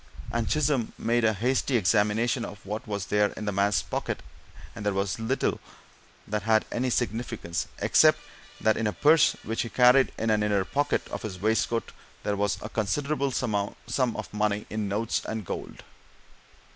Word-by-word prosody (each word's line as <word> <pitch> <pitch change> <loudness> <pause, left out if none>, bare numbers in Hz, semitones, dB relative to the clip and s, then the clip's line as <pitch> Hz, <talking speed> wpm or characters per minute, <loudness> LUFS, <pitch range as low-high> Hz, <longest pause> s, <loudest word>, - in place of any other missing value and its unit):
And 115 -1 -1
Chisholm 145 -6 +1
made 120 +1 +1
a 110 -1 +4
hasty 125 +4 +1
examination 110 +4 +2
of 105 -3 -8
what 105 +2 -4
there 105 - -10 0.4
was - - -11
in 105 - -5
the 105 - 0
man's 100 +1 +2
pockets, - - -3 0.5
and 110 - -7
there 100 -1 0
was 100 +1 -1
little 115 - 0 0.7
that 105 0 -1
had 110 -1 +3
any 125 +2 0
significance, 115 -7 -2
except - - +5 0.4
that 110 -1 +2
in 115 - 0
a 105 - -1
purse 155 0 +5
which 115 +1 -2
he 115 - -3
carried 125 +2 +5
in 115 0 0
an 105 0 +2
inner 100 -2 +1
pocket 145 +8 0
of - - -5
his 95 -4 -6
waistcoat 110 +3 0 0.3
there 105 - 0
was 105 0 0
a 105 - -5
considerable 140 +7 -1
sum 110 -6 -1 0.4
of 110 -1 -6
money 105 0 0
in 105 -1 -2
notes 105 +3 0
and 110 -2 -4
gold. - - -6
110 Hz, 170 wpm, -27 LUFS, 105-120 Hz, 0.7 s, except